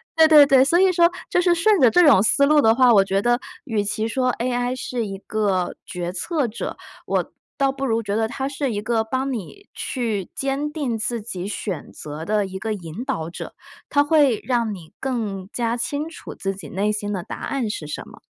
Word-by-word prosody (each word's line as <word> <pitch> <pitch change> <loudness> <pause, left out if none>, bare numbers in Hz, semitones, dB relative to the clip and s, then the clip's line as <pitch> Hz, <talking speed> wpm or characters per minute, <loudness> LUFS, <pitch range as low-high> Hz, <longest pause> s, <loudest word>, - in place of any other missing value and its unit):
对， 320 -1 +7
对， 300 -2 +8
对， 270 -2 +6
所 340 +5 +3
以 380 0 +5
说 340 -1 +5 0.2
就 360 - +2
是 355 -1 +4
顺 400 +4 +3
着 255 - +6
这 355 +8 +5
种 280 -10 +7
思 280 +6 +4
路 300 +1 +5
的 225 -4 +5
话， 250 -1 +6
我 200 -3 +6
觉 195 0 0
得 240 +2 +2 0.3
与 220 -7 0
其 215 +2 -2
说 255 +2 +1
AI 245 +1 -1
是 250 -2 -3
一 195 -1 -5
个 195 -4 -1
决 175 -1 -4
策 295 - -1
者， 225 - -5 0.3
我 - - -1 0.3
倒 275 -1 +2
不 270 0 -4
如 230 -3 +1
觉 205 -1 -2
得 220 0 +1
它 265 +3 -3
是 280 -2 -2
一 205 - -2
个 225 +1 0
帮 260 +4 -2
你 255 - -7
去 220 -7 -3
坚 275 +2 -2
定 280 -7 -2
自 230 +1 -2
己 190 -4 -5
选 195 -6 -5
择 150 +2 -8
的 210 +1 +1
一 190 0 -7
个 220 +2 -2
引 180 +2 -7
导 160 -7 -3
者。 170 - -8 0.3
它 285 0 +4
会 290 -6 +3
让 235 -4 0
你 170 -5 -12
更 210 -8 -3
加 235 0 -1
清 285 +6 -3
楚 325 - -10
自 195 0 -3
己 195 - -10
内 200 +3 0
心 210 -1 -3
的 185 -3 -3
答 - - -7
案 260 -5 -2
是 160 -7 -5
什 150 - -6
么。 - - -14
235 Hz, 240 characters per minute, -22 LUFS, 205-275 Hz, 0.3 s, 对